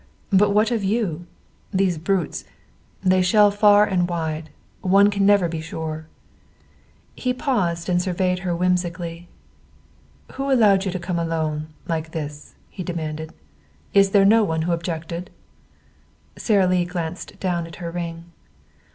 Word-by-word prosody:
But 200 +2 +5
what 210 +3 +2
of 225 -4 0
you? 190 -5 -1 0.4
These 185 -4 +1
brutes 180 0 -1 0.6
they 185 0 +4
shell 205 +3 +5
far 205 0 +5
and 180 -3 0
wide. 160 -2 -3 0.3
One 200 +2 +5
can 200 -1 +1
never 200 -4 +5
be 165 -1 -4
sure." 160 -1 -6 1.1
He 250 -1 -2
paused 180 - -1
and 180 -1 +2
surveyed 180 0 0
her 180 -1 -2
whimsically. 175 -1 -2 1.0
"Who 275 +1 -3
allowed 205 -6 +4
you 190 - -1
to 185 - -3
come, 175 -1 -3
alone, 160 -2 -2 0.2
like 160 -1 -3
this?" 150 -2 -6 0.2
he 190 - -7
demanded. 160 -3 -4 0.6
"Is 195 0 +5
there 195 0 +4
no 220 +2 +5
one 160 -4 -1
who 175 - -1
objected?" 170 +1 -4 1.1
Sara 200 -4 +2
Lee 180 -1 +2
glanced 175 -1 -5
down 175 -3 -1
at 165 - -11
her 170 -2 -6
ring. 170 -1 -5
180 Hz, 140 wpm, -22 LUFS, 165-195 Hz, 1.1 s, But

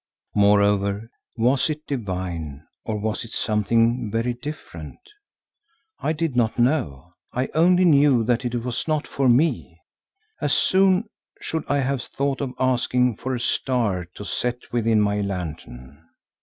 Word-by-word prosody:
Moreover, 100 +1 +2 0.3
was 125 +6 +2
it 155 0 -4
divine, 90 - -4 0.2
or 110 -2 -3
was 110 +1 -2
it 115 - -10
something 115 +2 +1
very 115 +3 -1
different? 145 +6 -8 1.0
I 150 - -1
did 160 -3 -2
not 115 -2 +1
know, 120 - 0 0.2
I 130 +2 -2
only 180 +3 +4
knew 140 -6 +5
that 120 +2 0
it 120 0 -2
was 125 +4 -2
not 155 -1 0
for 135 -2 0
me; 140 +7 +1 0.6
as - - +1
soon 190 +2 +3 0.3
should 160 - -4
I 145 0 +1
have 135 -1 -1
thought 140 +3 -2
of 130 -3 -4
asking 125 -2 +1
for 130 0 -3
a - - -4
star 115 -7 0
to 105 - -8
set 120 +5 -3
within 115 -2 +2
my 105 0 +1
lantern. 75 -7 -6
120 Hz, 140 wpm, -23 LUFS, 105-140 Hz, 1.0 s, knew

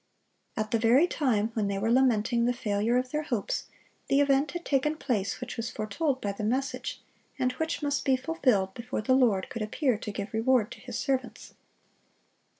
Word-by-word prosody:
At 215 -1 -2
the 230 - +2
very 240 +8 +5
time 230 -10 0
when 215 -3 0
they 200 0 -1
were 220 +4 0
lamenting 235 -2 +3
the 245 - +2
failure 220 +1 0
of 255 0 -1
their 300 - 0
hopes, 245 -9 -2 0.4
the 275 - +3
event 280 +1 +3
had 345 0 -5
taken 295 +2 +1
place 230 -10 -2
which 250 0 -6
was 230 +1 -2
foretold 260 +7 -2
by 205 - -2
the 200 +2 -6
message, 260 +6 -2 0.4
and 255 0 +1
which 320 +4 -3
must 285 -1 0
be 265 -2 +3
fulfilled 255 - +1
before 245 -1 -4
the 255 - +3
Lord 230 -8 +3
could 230 - -4
appear 225 +2 0
to 210 - -5
give 200 +1 -5
reward 225 0 +2
to - - -9
His - - -6
servants. 260 -2 -3
245 Hz, 190 wpm, -28 LUFS, 215-270 Hz, 0.4 s, very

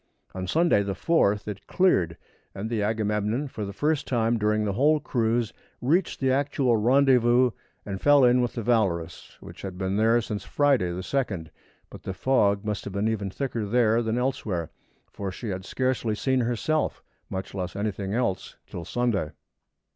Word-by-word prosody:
On 95 0 -4
Sunday, 160 - +3
the 100 -1 -3
4th, 105 -12 +1
it 105 -3 -7
cleared, 90 - +2 0.4
and 105 +4 -5
the 110 -3 0
Agamemnon 105 +4 0
for 110 -5 -5
the 100 - -5
first 150 +8 -1
time 115 -2 +1
during 105 0 +1
the 100 - -1
whole 150 +7 +3
cruise, 115 -5 0 0.3
reached 165 +8 +1
the 130 -1 +2
actual 135 -2 +1
rendezvous 125 +1 +4 0.3
and 95 -2 -5
fell 145 -1 +6
in 125 0 +5
with 120 - -1
the 115 - -4
Valorous, 95 -8 -1
which - - -11
had 95 -2 -6
been 95 +1 -1
there 115 +2 +4
since 105 -3 -4
Friday, 140 -11 +2
the 90 +1 -4
2d, 95 - -2 0.4
but - - -10
the 95 - -5
fog 100 -2 +2
must 105 -1 -2
have 100 - -6
been 100 +2 0
even 105 -3 -1
thicker 120 +1 -3
there 115 +1 +3
than 110 0 -1
elsewhere, 105 - -2 0.4
for 100 -2 -5
she 110 +4 -6
had 95 -1 -4
scarcely 130 -3 -1
seen 130 +3 +1
herself, 125 +6 -1 0.3
much 95 0 -5
less 95 -2 -4
anything 100 -1 -3
else 105 -7 -2
till 85 - -7
Sunday. 115 -10 0
110 Hz, 175 wpm, -26 LUFS, 100-125 Hz, 0.4 s, fell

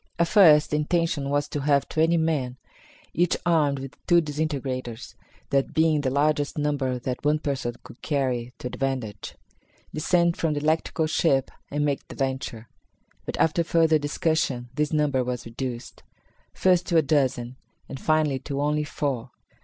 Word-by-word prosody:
At 170 -1 +2
first 160 -8 +6
the 150 - +2
intention 150 -2 0
was 145 0 0
to 145 - -3
have 140 0 +2
twenty 165 +2 +2
men, 145 -6 -1 0.6
each 175 0 +2
armed 155 -5 +2
with 135 +1 -9
two 175 -1 +6
disintegrators 140 -6 -3 0.4
(that 140 -1 +1
being 160 -2 +3
the 135 - 0
largest 145 +2 +1
number 145 -4 0
that 125 +1 -4
one 150 +1 +3
person 135 -6 -3
could 120 - -14
carry 130 -5 -1
to - - -11
advantage) 125 -4 -4 0.6
descend 170 +2 +2
from 155 -2 0
the - - -1
electrical 160 +1 0
ship 155 -4 +1 0.2
and 145 +1 -1
make 140 -2 -2
the - - -10
venture. 130 -4 -3 0.6
But, - - -4
after 160 +1 +2
further 160 -1 +3
discussion, 145 -4 -1
this 150 +2 -1
number 150 -4 +1
was 125 -1 -4
reduced; 120 +1 -6 0.5
first 180 -1 +2
to 170 - +2
a 160 - +5
dozen, 130 -4 0 0.3
and 135 - -7
finally, 155 -4 +1
to 140 +1 -5
only 150 +1 +1
four. 135 -4 -3
145 Hz, 160 wpm, -25 LUFS, 130-155 Hz, 0.6 s, first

